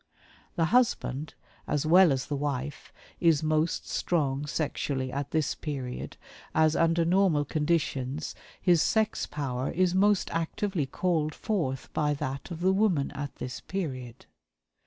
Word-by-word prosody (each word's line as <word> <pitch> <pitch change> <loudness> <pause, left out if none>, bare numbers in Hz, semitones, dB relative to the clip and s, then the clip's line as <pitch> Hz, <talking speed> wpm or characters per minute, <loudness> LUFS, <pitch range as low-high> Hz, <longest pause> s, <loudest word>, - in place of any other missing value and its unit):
The 165 - +2
husband, 155 - +1 0.3
as 150 0 0
well 175 +1 +7
as 130 -2 0
the 145 - -3
wife, 140 0 -3 0.3
is 165 -4 +3
most 155 +1 0
strong 145 -4 0
sexually 140 -4 -2
at 140 +1 -3
this 155 -4 0
period, 135 -5 -5 0.4
as 155 0 +4
under 165 0 +3
normal 175 -4 +3
conditions 150 -2 -1 0.3
his 175 -3 +4
sex 220 +6 +1
power 135 -3 -3
is 180 0 +1
most 200 +1 +3
actively 165 -1 -1
called 155 0 0
forth 135 -12 -2
by 150 -1 +1
that 135 +2 -4
of 170 -1 -6
the 190 +1 +3
woman 190 -8 +2
at 145 0 -6
this 125 - -6
period. 130 -10 -5
155 Hz, 135 wpm, -28 LUFS, 140-175 Hz, 0.4 s, well